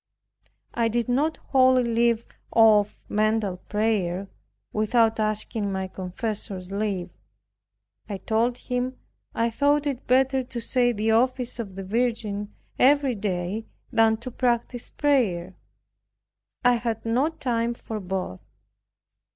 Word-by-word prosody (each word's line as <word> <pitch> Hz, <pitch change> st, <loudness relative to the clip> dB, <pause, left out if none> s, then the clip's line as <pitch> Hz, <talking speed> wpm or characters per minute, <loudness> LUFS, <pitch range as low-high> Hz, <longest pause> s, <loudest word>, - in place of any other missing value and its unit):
I 235 Hz, -1 st, +1 dB
did 235 Hz, +1 st, 0 dB
not 290 Hz, +6 st, +1 dB
wholly 260 Hz, -2 st, +4 dB
leave 235 Hz, 0 st, +2 dB, 0.2 s
off 215 Hz, -2 st, +4 dB
mental 215 Hz, -3 st, +1 dB
prayer, 200 Hz, -3 st, -1 dB, 0.5 s
without 225 Hz, +1 st, +2 dB
asking 215 Hz, -1 st, -1 dB
my 190 Hz, 0 st, -2 dB
confessor's 190 Hz, 0 st, -4 dB
leave. 195 Hz, -3 st, -2 dB, 1.0 s
I 200 Hz, -, -3 dB
told 225 Hz, +5 st, 0 dB
him 250 Hz, +1 st, -3 dB, 0.4 s
I 230 Hz, 0 st, +1 dB
thought 290 Hz, +4 st, +2 dB
it 275 Hz, -4 st, -3 dB
better 265 Hz, +1 st, +3 dB
to 245 Hz, -1 st, -6 dB
say 245 Hz, +1 st, +2 dB
the 220 Hz, 0 st, 0 dB
office 250 Hz, +2 st, +1 dB
of 200 Hz, -5 st, -5 dB
the 195 Hz, -, -5 dB
Virgin 210 Hz, -1 st, -1 dB, 0.3 s
every 275 Hz, 0 st, +4 dB
day 200 Hz, 0 st, -3 dB, 0.2 s
than 225 Hz, -2 st, +4 dB
to 255 Hz, -, -6 dB
practice 240 Hz, 0 st, -1 dB
prayer; 205 Hz, -12 st, +1 dB, 1.1 s
I 245 Hz, -1 st, +5 dB
had 230 Hz, -2 st, -3 dB
not 265 Hz, +8 st, 0 dB
time 235 Hz, -2 st, 0 dB
for 220 Hz, -2 st, -6 dB
both. 185 Hz, -, -4 dB
225 Hz, 120 wpm, -25 LUFS, 205-245 Hz, 1.1 s, I